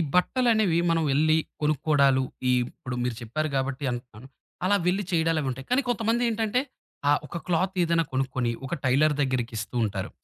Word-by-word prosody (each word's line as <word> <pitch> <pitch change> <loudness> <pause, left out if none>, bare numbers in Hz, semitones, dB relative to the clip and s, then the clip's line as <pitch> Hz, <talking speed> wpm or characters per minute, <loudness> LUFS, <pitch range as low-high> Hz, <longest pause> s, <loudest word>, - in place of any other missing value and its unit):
బట్టలనేవి 215 -3 +3
మనం 165 -1 +2
వెళ్లి, 155 +3 +3 0.3
కొనుక్కోడాలు. 140 -3 +3 0.3
ఈ - - +4 0.2
ఇప్పుడు 125 -1 -7
మీరు 125 - -1
చెప్పారు 155 +7 -2
గాబట్టి 135 +1 -1
అంటున్నాను. 120 -1 -8 0.4
అలా 205 +2 +4
వెళ్లి 190 +3 +2
చేయడాలు 165 -1 +2
అవి 135 - -2
ఉంటాయి. 130 +1 -7
కానీ 265 +3 +3
కొంతమంది 235 0 +1
ఏంటంటే, 225 +2 0 0.5
ఆ - - +6
ఒక 170 - -5
క్లాత్ 180 +2 +1
ఏదైనా 165 -1 +2
కొనుక్కొని, 130 -2 -1
ఒక 155 - -2
టైలర్ 150 +4 +3
దగ్గరికిస్తూ 120 -4 -2
ఉంటారు. 100 -2 -3
155 Hz, 160 wpm, -26 LUFS, 130-180 Hz, 0.5 s, ఆ